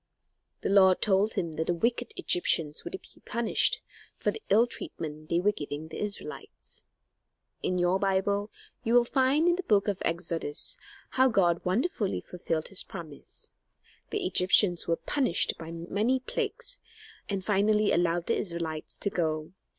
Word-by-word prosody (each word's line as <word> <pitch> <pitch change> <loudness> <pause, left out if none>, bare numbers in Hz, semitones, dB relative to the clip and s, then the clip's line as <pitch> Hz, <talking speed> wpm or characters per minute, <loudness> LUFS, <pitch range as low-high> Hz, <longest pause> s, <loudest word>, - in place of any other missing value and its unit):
The - - -1
Lord 190 -2 +6
told 205 +1 +3
him 165 -3 -2
that 160 - -1
the 175 - +1
wicked 235 +6 -1
Egyptians 160 -3 +1
would 380 - -5
be - - -16
punished 235 -1 +1 0.3
for - - 0
the 445 - -9
ill 220 +4 +6
treatment 155 -9 -7
they 170 - +2
were 205 +4 +3
giving 150 -3 -6
the - - -7
Israelites. 210 -1 -6 0.8
In 180 - 0
your 180 +2 +2
Bible 200 +1 +1 0.3
you 230 +1 +1
will 240 -1 +6
find 270 +6 +2
in 350 0 +3
the - - -1
book 210 - +2
of 200 -2 -1
Exodus 170 - 0 0.3
how 260 0 +4
God 175 -8 +2
wonderfully 210 - 0
fulfilled 165 -3 -3
his 195 - +3
promise. 155 -4 -7 0.6
The - - -2
Egyptians 180 0 +3
were 165 - +2
punished 255 - 0
by 165 -1 -7
many 200 +10 0
plagues, 475 - -2 0.5
and 195 -2 -2
finally 210 +1 +3
allowed 175 0 +1
the 230 - +1
Israelites 170 -4 -3
to 200 - 0
go. 155 -2 -1
190 Hz, 155 wpm, -29 LUFS, 170-230 Hz, 0.8 s, Lord